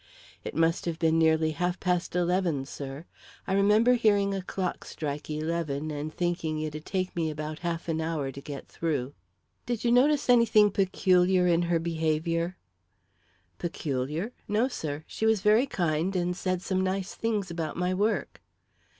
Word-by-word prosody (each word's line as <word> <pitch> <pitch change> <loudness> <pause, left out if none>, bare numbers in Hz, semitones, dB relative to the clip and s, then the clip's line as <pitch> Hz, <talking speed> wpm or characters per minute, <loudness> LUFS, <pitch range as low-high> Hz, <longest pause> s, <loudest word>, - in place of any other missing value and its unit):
"It - - -6
must 165 +1 +2
have 170 -2 -2
been 165 -1 +2
nearly 160 0 +3
half 175 +4 -1
past 180 -1 -1
eleven, 175 -5 +1
sir. 140 +2 -7 0.4
I - - -1
remember 210 +5 +5
hearing 205 -4 +3
a 195 - -2
clock 185 0 -3
strike 150 -1 -5
eleven 155 -1 -2
and 150 +1 -4
thinking 165 -2 -1
it'd 155 0 -5
take 185 -1 -2
me 165 -2 0
about 155 +1 -5
half 170 -1 -3
an 160 -1 -1
hour 155 -4 -2
to 140 - -9
get 140 -1 -8
through." 145 -5 -2 0.5
"Did 240 -3 -2
you 235 - +2
notice 280 +4 +4
anything 230 -4 +5
peculiar 185 -1 +3
in 175 -1 +3
her 170 - +3
behaviour?" 165 +1 -1 1.0
"Peculiar? 155 - -3
No, 215 +5 +2
sir. 155 - -5
She 220 - -2
was 220 -3 +3
very 215 +6 +4
kind 170 - 0
and 180 0 0
said 185 0 -2
some 185 -1 0
nice 190 0 -1
things 215 -5 -2
about 165 -2 -4
my 180 +1 0
work." 205 +4 -1
175 Hz, 160 wpm, -28 LUFS, 155-195 Hz, 1.0 s, remember